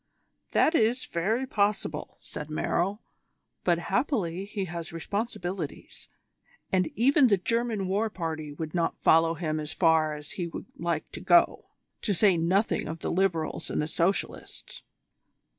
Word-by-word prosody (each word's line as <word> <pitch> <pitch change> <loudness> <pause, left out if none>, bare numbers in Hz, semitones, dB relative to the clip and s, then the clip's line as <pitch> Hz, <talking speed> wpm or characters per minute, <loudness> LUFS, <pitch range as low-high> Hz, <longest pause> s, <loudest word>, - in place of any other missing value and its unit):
"That 320 - +3
is 240 -3 +2
very 220 +10 0
possible," 200 - -1
said 150 - -7
Merrill; 185 +6 -1 0.6
"but 175 -2 +3
happily 195 - -1
he 200 -1 -3
has 170 -1 -6
responsibilities, 180 -1 -4 0.6
and 185 -2 +2
even 270 - +5
the 200 -4 +4
German 230 0 -1
war 205 +4 +1
party 160 -6 -4
would 155 +1 -6
not 170 -2 0
follow 165 +1 +5
him 155 -1 -2
as 150 0 -4
far 160 -3 +3
as 150 -1 -8
he 175 -2 -3
would 165 - -7
like 170 -2 -2
to - - -7
go, 175 -1 +4 0.3
to 205 - +1
say 195 0 +5
nothing 185 +6 +1
of 160 +1 -6
the - - -2
Liberals 170 -4 0
and - - -1
the 150 - 0
Socialists. 170 +4 -2
175 Hz, 145 wpm, -28 LUFS, 165-205 Hz, 0.6 s, even